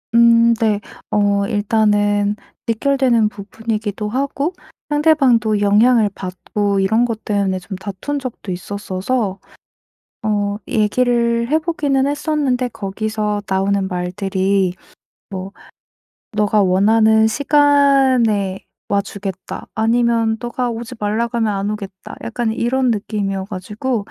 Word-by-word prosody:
음, 235 Hz, 0 st, +6 dB
네. 215 Hz, -2 st, +1 dB, 0.3 s
어 200 Hz, -1 st, +2 dB
일단은 205 Hz, -1 st, +2 dB, 0.3 s
직결되는 235 Hz, -2 st, +2 dB
부분이기도 215 Hz, 0 st, -4 dB
하고 280 Hz, -, -1 dB, 0.4 s
상대방도 270 Hz, -8 st, +3 dB
영향을 215 Hz, +2 st, +4 dB
받고 195 Hz, +2 st, -2 dB
이런 220 Hz, +5 st, +2 dB
것 225 Hz, -2 st, -4 dB
때문에 200 Hz, -3 st, 0 dB
좀 190 Hz, +1 st, -7 dB
다툰 200 Hz, +9 st, -4 dB
적도 250 Hz, -7 st, -6 dB
있었어서 195 Hz, +3 st, -3 dB, 0.8 s
어 205 Hz, -1 st, 0 dB
얘기를 235 Hz, +1 st, +1 dB
해 310 Hz, -, +4 dB
보기는 295 Hz, -5 st, 0 dB
했었는데 285 Hz, -4 st, 0 dB
거기서 210 Hz, 0 st, -3 dB
나오는 195 Hz, 0 st, +1 dB
말들이 190 Hz, +1 st, 0 dB, 0.5 s
뭐 190 Hz, 0 st, -6 dB, 0.8 s
"너가 210 Hz, 0 st, +2 dB
원하는 220 Hz, +4 st, +4 dB
시간에 265 Hz, -7 st, +3 dB, 0.3 s
와주겠다." 200 Hz, -1 st, -4 dB
아니면 230 Hz, 0 st, +2 dB
"너가 240 Hz, +1 st, -2 dB
오지 235 Hz, +2 st, -6 dB
말라고 225 Hz, +3 st, -1 dB
하면 220 Hz, -3 st, +1 dB
안 195 Hz, +1 st, -2 dB
오겠다." 195 Hz, -3 st, -7 dB
약간 230 Hz, -1 st, -2 dB
이런 250 Hz, +3 st, 0 dB
느낌이어 200 Hz, -2 st, -2 dB
가지고 210 Hz, +4 st, -3 dB
215 Hz, 255 characters per minute, -18 LUFS, 200-240 Hz, 0.8 s, 음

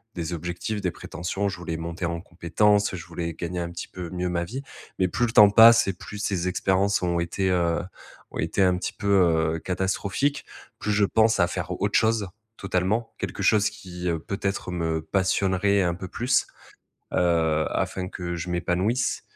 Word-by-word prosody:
des 85 Hz, 0 st, -3 dB
objectifs, 90 Hz, +5 st, -4 dB
des 90 Hz, -, -1 dB
prétentions, 90 Hz, +5 st, -4 dB
je 95 Hz, -, -6 dB
voulais 80 Hz, -2 st, -4 dB
monter 85 Hz, +2 st, -4 dB
en 85 Hz, 0 st, -3 dB
compétences, 100 Hz, +4 st, +1 dB
je 85 Hz, -1 st, -8 dB
voulais 85 Hz, -1 st, -4 dB
gagner 90 Hz, +1 st, -4 dB
un 85 Hz, -, -3 dB
petit 85 Hz, -, -6 dB
peu 90 Hz, -2 st, -7 dB
mieux 90 Hz, 0 st, -2 dB
ma 85 Hz, -1 st, -1 dB
vie. 130 Hz, +8 st, -6 dB, 0.4 s
Mais 95 Hz, -, +3 dB
plus 120 Hz, +7 st, 0 dB
le -, -, -4 dB
temps 105 Hz, -1 st, +8 dB
passe 115 Hz, 0 st, +8 dB
et 95 Hz, -, 0 dB
plus 105 Hz, +3 st, -9 dB
ces 95 Hz, -3 st, -1 dB
expériences 95 Hz, +2 st, +1 dB
ont 85 Hz, -1 st, +1 dB
été, 95 Hz, +3 st, -1 dB
heu, 85 Hz, -2 st, +1 dB, 0.5 s
ont -, -, -6 dB
été 80 Hz, +5 st, 0 dB
un 90 Hz, -1 st, +4 dB
petit -, -, -3 dB
peu, 100 Hz, -, -5 dB, 0.5 s
heu, -, -, -4 dB
catastrophiques, 95 Hz, -, -1 dB, 0.3 s
plus 105 Hz, -, -2 dB
je 105 Hz, 0 st, +3 dB
pense 110 Hz, +2 st, +3 dB
à 85 Hz, -, +4 dB
faire 90 Hz, 0 st, -4 dB
autre 100 Hz, 0 st, +2 dB
chose, 110 Hz, -3 st, +2 dB, 0.3 s
totalement. 95 Hz, +4 st, -1 dB
Quelque -, -, -4 dB
chose 105 Hz, -1 st, +4 dB
qui, 90 Hz, -4 st, -8 dB
heu, 80 Hz, -1 st, -1 dB
peut-être 100 Hz, +1 st, -3 dB
me 80 Hz, -2 st, -1 dB
passionnerait 95 Hz, +2 st, +1 dB
un 85 Hz, -, +1 dB
peu 95 Hz, +1 st, -7 dB
plus, 125 Hz, +5 st, +1 dB, 0.7 s
heu, 80 Hz, -3 st, +2 dB
afin 90 Hz, -1 st, -2 dB
que 85 Hz, -1 st, -5 dB
je 85 Hz, +1 st, -5 dB
m'épanouisse. 95 Hz, +8 st, 0 dB
90 Hz, 185 wpm, -25 LUFS, 85-100 Hz, 0.7 s, temps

